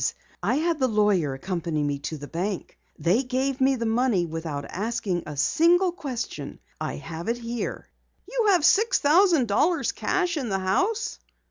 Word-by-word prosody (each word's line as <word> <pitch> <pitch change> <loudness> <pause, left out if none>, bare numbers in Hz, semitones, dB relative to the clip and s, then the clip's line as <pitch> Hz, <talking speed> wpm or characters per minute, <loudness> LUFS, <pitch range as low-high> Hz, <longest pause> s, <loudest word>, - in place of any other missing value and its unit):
I - - +1
had 325 +1 0
the 260 - +3
lawyer 205 - +2
accompany 165 0 -2
me 145 -1 -1
to 155 +2 -5
the 145 0 -8
bank. 185 +4 -4 0.2
They 185 +9 +2
gave 265 +1 -1
me 265 +1 +4
the 230 -2 -3
money 225 -5 +2
without 160 -3 -5
asking 205 -3 -2
a 150 -2 -7
single 345 - +3
question. 275 - -5 0.2
I - - -2
have 165 +1 -7
it 235 +1 0
here." 235 0 -4 0.4
"You 475 +1 0
have 360 -6 +4
six 445 +5 +4
thousand 320 -3 +4
dollars 290 - +2
cash 360 -3 -1
in 260 -6 -2
the 195 - 0
house!" 375 - 0
235 Hz, 165 wpm, -25 LUFS, -, 0.4 s, me